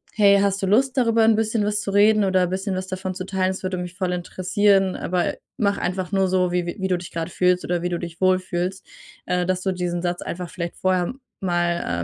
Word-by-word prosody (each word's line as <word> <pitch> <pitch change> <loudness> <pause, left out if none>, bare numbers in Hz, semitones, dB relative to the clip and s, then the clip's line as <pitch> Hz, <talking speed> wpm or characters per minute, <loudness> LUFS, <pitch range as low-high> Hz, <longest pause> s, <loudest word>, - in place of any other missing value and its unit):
„Hey, 200 -2 +5
hast 200 0 +1
du - - +1
Lust, 255 +6 +3
darüber 230 -3 +3
'n 220 0 +5
bisschen 220 -1 0
was 210 0 0
zu - - -4
reden 210 +1 +5
oder 185 -1 +3
bisschen 190 +2 -2
was 185 0 -3
davon 185 0 -4
zu 185 0 -5
teilen? 190 -1 0
Das 190 - -7
würde 185 0 -2
mich 180 0 -6
voll 185 -1 -1
interessieren, 185 +2 +1
aber 180 0 -1 0.2
mach 200 -2 +1
einfach 180 +1 -2
nur 195 -1 +2
so, 180 -1 +1
wie 180 0 0
wie 190 +2 -3
du 180 - +2
dich 175 -1 -9
grade 165 +1 -4
fühlst 180 0 +2
oder 175 -1 -1
wie 175 - 0
du 175 - -1
dich 170 0 -8
wohlfühlst.“ 185 0 0 0.4
Äh, 180 0 +1
dass 185 0 0
du 190 - 0
diesen 175 -1 -2
Satz 175 0 -2
einfach 175 -1 -5
vielleicht 170 -1 -5
vorher 185 0 +1 0.3
mal, 175 - 0
185 Hz, 230 wpm, -23 LUFS, 180-195 Hz, 0.4 s, Hey